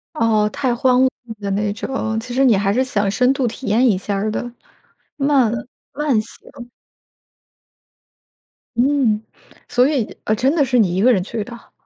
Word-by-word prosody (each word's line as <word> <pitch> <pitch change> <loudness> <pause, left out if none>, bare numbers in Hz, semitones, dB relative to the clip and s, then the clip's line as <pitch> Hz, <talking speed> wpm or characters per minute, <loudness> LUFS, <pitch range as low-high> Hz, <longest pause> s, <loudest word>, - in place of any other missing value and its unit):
哦， 220 -5 +2
太 265 -3 -1
荒 250 +1 +3
芜 260 - +3 0.3
的 200 -1 -3
那 205 +1 0
种。 220 0 -3
其 245 +1 -7
实 270 +2 +3
你 235 -6 +5
还 195 0 +1
是 250 +5 +2
想 210 -6 -1
深 250 +6 +2
度 270 -2 -1
体 240 +3 -6
验 235 +5 +3
一 205 - +2
下 195 +1 -3
的， - - -3 0.7
慢 275 -5 +2 0.4
慢 285 -6 +1
行。 240 +3 -12 2.1
嗯， 250 -4 +2 0.5
所 250 +2 +3
以， 270 -8 -2
呃， 215 - +1
真 265 +6 +1
的 305 -4 +3
是 250 -2 +1
你 190 -6 +2
一 190 - 0
个 250 +2 +6
人 190 - +1
去 220 +1 -4
的？ 235 +1 -12
240 Hz, 180 characters per minute, -19 LUFS, 210-260 Hz, 2.1 s, 个